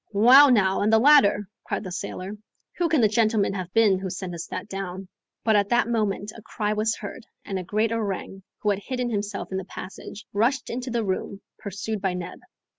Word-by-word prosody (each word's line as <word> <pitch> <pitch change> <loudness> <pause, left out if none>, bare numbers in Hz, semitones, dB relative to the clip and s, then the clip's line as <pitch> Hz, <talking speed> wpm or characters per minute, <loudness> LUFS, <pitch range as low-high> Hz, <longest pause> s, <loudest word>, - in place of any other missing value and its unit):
"Well 255 +8 +8
now, 195 -5 +3
and 210 +2 +2
the 225 - +6
ladder," 220 -6 +5 0.2
cried - - -3
the 185 - -7
sailor; 185 +1 -5 0.5
"who 345 -1 +2
can 310 -5 +3
the 220 - +6
gentleman 215 -2 +2
have 185 -2 -5
been 210 -4 +4
who 190 0 -4
sent 180 0 -5
us 170 -1 -6
that - - -6
down?" 195 -1 -6 0.4
But 220 -1 +3
at 205 -1 +2
that 240 -1 +3
moment 215 -3 -1
a 230 - -11
cry 210 0 -2
was 215 +1 0
heard, 220 +3 -9 0.2
and 195 -1 -3
a - - -5
great 215 +5 0
orang, 200 -3 -3 0.2
who 210 - +3
had 200 - -1
hidden 250 +2 -3
himself 205 -2 -3
in 190 - -1
the 190 - -7
passage, 195 +2 -9
rushed 235 +7 +1
into 250 +2 -4
the 235 -2 -1
room, 195 +1 -3 0.2
pursued 205 0 -4
by 190 -2 0
Neb. 180 -1 -6
210 Hz, 210 wpm, -25 LUFS, 195-225 Hz, 0.5 s, Well